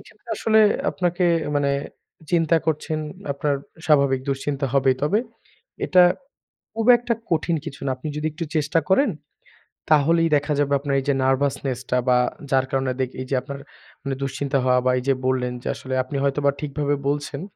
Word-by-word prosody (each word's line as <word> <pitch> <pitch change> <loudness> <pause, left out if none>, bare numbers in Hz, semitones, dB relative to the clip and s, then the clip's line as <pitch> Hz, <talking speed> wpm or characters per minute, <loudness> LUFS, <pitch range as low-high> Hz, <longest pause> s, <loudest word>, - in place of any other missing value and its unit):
এখানে 215 - -19
আসলে 220 0 +3 0.3
আপনাকে 175 0 0 0.3
মানে 140 -1 +1 0.6
চিন্তা 165 -1 +3
করছেন 155 0 -1 0.3
আপনার 140 +1 -1 0.3
স্বাভাবিক 140 -4 +3
দুশ্চিন্তা 140 +1 -1
হবেই, 135 -1 +3
তবে 185 +9 +2 0.7
এটা 185 -1 +6 0.7
খুব 225 0 -2
একটা 240 0 -1 0.2
কঠিন 165 +1 +1
কিছু 140 -4 -8
না, - - 0
আপনি 130 +4 -8
যদি 150 - -1
একটু 165 +2 -4
চেষ্টা 155 +2 +2
করেন 235 +7 +4 0.8
তাহলেই 165 +3 +4
দেখা 145 +1 -2
যাবে 140 0 +1
আপনার 140 0 -2
এইযে 140 +1 0
নার্ভাসনেসটা 130 -1 0
বা 125 - +5 0.3
যার 135 -1 +3
কারণে 135 -1 0
দিক 130 -1 -1
এইযে 130 +1 -2
আপনার 140 +1 -7 0.6
দুশ্চিন্তা 135 +1 -1
হওয়া 125 0 +3
বা 130 - +4
এইযে 135 +2 +1
বললেন 125 -1 0
যে - - -5
আসলে 130 - -6
আপনি 135 +2 -5
হয়তোবা 140 0 +2
ঠিকভাবে 145 0 -1
বলছেন, 145 0 -3
140 Hz, 155 wpm, -23 LUFS, 135-160 Hz, 0.8 s, এটা